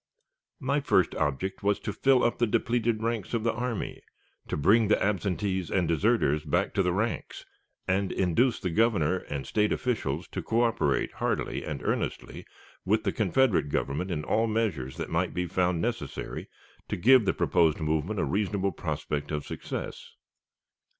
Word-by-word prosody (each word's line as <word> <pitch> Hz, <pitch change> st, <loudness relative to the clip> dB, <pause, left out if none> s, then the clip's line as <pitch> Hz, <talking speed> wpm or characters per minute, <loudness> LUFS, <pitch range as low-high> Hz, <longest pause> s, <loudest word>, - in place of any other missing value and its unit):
My 140 Hz, 0 st, +1 dB
first 95 Hz, -, +2 dB
object 80 Hz, +6 st, -2 dB
was 100 Hz, 0 st, +1 dB
to 105 Hz, -, -3 dB
fill 130 Hz, +3 st, +3 dB
up 120 Hz, -, +1 dB
the 120 Hz, -, +3 dB
depleted 115 Hz, 0 st, 0 dB
ranks 115 Hz, -1 st, -2 dB
of 115 Hz, -, -1 dB
the 115 Hz, -1 st, +1 dB
army, 120 Hz, -1 st, -3 dB, 0.5 s
to -, -, -2 dB
bring 105 Hz, +9 st, +4 dB
the 105 Hz, -, +3 dB
absentees 95 Hz, -2 st, -1 dB
and 90 Hz, -3 st, +1 dB
deserters 85 Hz, -3 st, +2 dB
back 85 Hz, +5 st, 0 dB
to 100 Hz, -, +2 dB
the 90 Hz, -1 st, +1 dB
ranks, 110 Hz, +6 st, -3 dB, 0.4 s
and 95 Hz, +1 st, +1 dB
induce 110 Hz, +7 st, +2 dB
the 90 Hz, -, -2 dB
Governor 95 Hz, -4 st, +2 dB
and 70 Hz, -6 st, -5 dB
State 105 Hz, -1 st, +1 dB
officials 90 Hz, -, -1 dB
to -, -, -4 dB
coöperate 115 Hz, -, +1 dB
heartily -, -, -2 dB
and -, -, -5 dB
earnestly -, -, -3 dB, 0.4 s
with 110 Hz, +3 st, +1 dB
the -, -, +1 dB
Confederate 110 Hz, -, +2 dB
Government 70 Hz, +6 st, -1 dB
in 80 Hz, -4 st, -2 dB
all 110 Hz, +7 st, +1 dB
measures 105 Hz, -, -1 dB
that -, -, -5 dB
might -, -, 0 dB
be 90 Hz, -, 0 dB
found 90 Hz, -1 st, 0 dB
necessary 115 Hz, -, -4 dB, 0.4 s
to -, -, -2 dB
give 120 Hz, +5 st, +6 dB
the -, -, +3 dB
proposed 80 Hz, -3 st, +2 dB
movement 80 Hz, +6 st, -1 dB
a -, -, +1 dB
reasonable 100 Hz, -1 st, 0 dB
prospect 75 Hz, -2 st, -3 dB
of 75 Hz, -1 st, -3 dB
success. -, -, -6 dB
100 Hz, 165 wpm, -28 LUFS, 85-115 Hz, 0.5 s, give